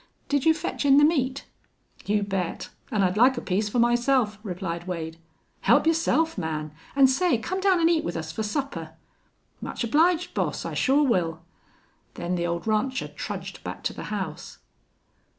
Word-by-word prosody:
Did 285 -2 +1
you 320 0 +5
fetch 325 0 -3
in 275 -1 +6
the 290 - +7
meat?" 270 -4 0 0.6
"You 205 0 +2
bet. 195 -3 -3 0.2
An' 205 -3 +1
I'd 185 +1 +1
like 250 +3 +5
a - - 0
piece 205 +3 -1
for 245 - -2
myself," 240 -2 +2
replied 180 -3 -5
Wade. 165 -2 -5 0.4
"Help - - +4
yourself, 325 -3 +2
man. 155 -3 -3 0.2
An' 275 -1 +7
say, 265 +1 +3
come 370 - -3
down 380 -2 +3
an' 330 - +4
eat 335 -2 +2
with 175 - -3
us 160 0 -5
fer 220 - -4
supper." 210 - -3 0.7
"Much - - -4
obliged, 325 +8 +2
boss. - - -2
I - - -4
sure 285 +2 +3
will." 170 - 0 0.7
Then 175 - -3
the 175 -1 0
old 170 0 -3
rancher 235 +5 0
trudged - - -6
back - - -7
to - - -1
the - - -7
house. - - -5
235 Hz, 175 wpm, -25 LUFS, 180-290 Hz, 0.7 s, the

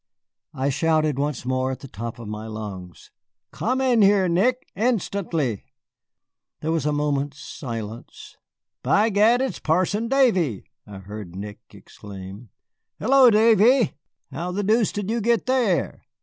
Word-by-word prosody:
I 135 +1 0
shouted 155 0 +1
once 145 -3 -2
more 130 +1 0
at 130 - -7
the 135 - -9
top 115 -1 -7
of 115 -2 -9
my 105 +1 -6
lungs: 100 -5 -8 0.4
"Come 255 +3 -1
in 250 -4 +3
here, 195 -2 +4
Nick, 215 +9 +1
instantly!" 185 - -1 1.0
There 160 - -1
was 160 -3 0
a - - +2
moment's 145 -1 -1
silence. 115 -3 -8 0.5
"By 205 - +3
gad, 225 +5 +4
it's 265 - -3
Parson 185 +7 0
Davy!" 210 - +2 0.2
I 100 -2 -9
heard 100 -2 -9
Nick 105 +2 -7
exclaim. 100 +2 -11 0.5
"Halloo, 265 -1 +6
Davy, 225 +3 +4 0.4
how 175 +5 -4
the 200 +3 -2
deuce 215 +1 +2
did 205 -2 -4
you 235 0 -1
get 235 +2 +1
there?" 235 - 0
160 Hz, 140 wpm, -23 LUFS, -, 1.0 s, Halloo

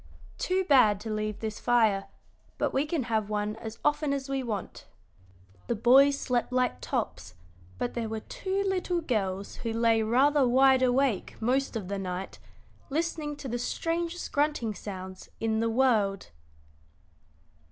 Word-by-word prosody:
Too 375 +1 +1
bad 250 - +5
to 220 0 -5
leave 215 -1 -3
this 220 -1 -4
fire, 220 -5 +2 0.5
but - - 0
we 275 +3 +1
can 310 -4 -1
have 220 -3 -1
one 210 0 -1
as 225 0 -7
often 295 -1 +2
as 275 -1 -3
we 270 -1 -1
want." 215 -6 -5 0.8
The 235 - 0
boys 270 +5 +5
slept 245 0 -1
like 250 -1 0
tops, - - -3 0.4
but 245 - -2
there 230 -2 -3
were 220 0 -4
two 390 - -3
little 370 -2 0
girls 200 - -2
who 230 - -3
lay 225 0 +3
rather 265 +5 +3
wide 265 +1 +5
awake 255 -3 +1
most 255 +3 0
of 210 -5 -4
the 200 +1 -3
night, 185 0 -5 0.5
listening 310 0 -2
to 285 -1 -8
the 240 -1 -3
strangest 335 +6 -2
grunting 290 -7 0
sounds 190 -1 -8
in 220 -1 0
the 230 0 +1
world. 225 -5 +1
240 Hz, 150 wpm, -28 LUFS, 215-280 Hz, 0.8 s, bad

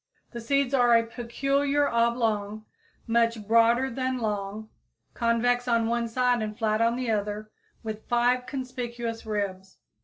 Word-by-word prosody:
The 235 - -7
seeds 275 +3 +1
are 245 -3 +5
a 230 - +1
peculiar 275 +5 0
oblong, 225 -3 0 0.4
much 230 -2 +1
broader 230 +3 +4
than 260 +1 -2
long, 210 -1 -3 0.5
convex 245 +1 +1
on 230 -1 +2
one 235 +1 0
side 245 0 +1
and 215 0 -4
flat 220 -1 0
on 230 +1 +3
the 250 -2 -2
other, 210 0 -3 0.3
with 220 -1 -6
five 245 +1 +2
conspicuous 240 -4 -5
ribs. 195 -3 -4
235 Hz, 135 wpm, -27 LUFS, 220-245 Hz, 0.5 s, are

